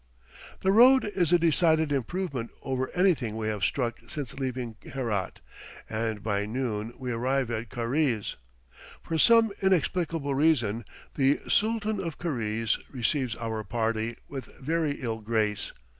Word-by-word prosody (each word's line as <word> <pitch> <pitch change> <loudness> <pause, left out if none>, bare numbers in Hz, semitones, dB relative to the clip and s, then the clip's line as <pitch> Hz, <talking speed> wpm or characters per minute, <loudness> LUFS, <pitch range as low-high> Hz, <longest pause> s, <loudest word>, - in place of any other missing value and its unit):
The 190 - +3
road 255 +5 +7
is 185 -6 0
a 175 - +7
decided 160 -2 +3
improvement 140 -2 -2
over 130 -1 -1
anything 155 - +2
we 110 -1 -1
have 105 -2 -3
struck 120 -4 0
since 140 -7 -4
leaving 125 -4 -4
Herat, 115 -8 -3 0.5
and 110 -2 -2
by 105 -1 0
noon 115 -2 -2
we 125 -1 -4
arrive 130 +1 0
at 115 0 -3
Karize. 120 -1 0 0.7
For 165 -1 -2
some 230 +3 +6
inexplicable 170 -5 +1
reason 120 -7 +2 0.3
the 135 0 +3
Sooltan 215 -1 +1
of 170 -5 -4
Karize 115 -8 -1
receives 125 0 0
our 110 -2 -3
party 115 +2 -1
with 135 -2 -6
very 155 +1 0
ill 115 -5 -4
grace. 105 -2 -1
130 Hz, 135 wpm, -28 LUFS, 115-160 Hz, 0.7 s, road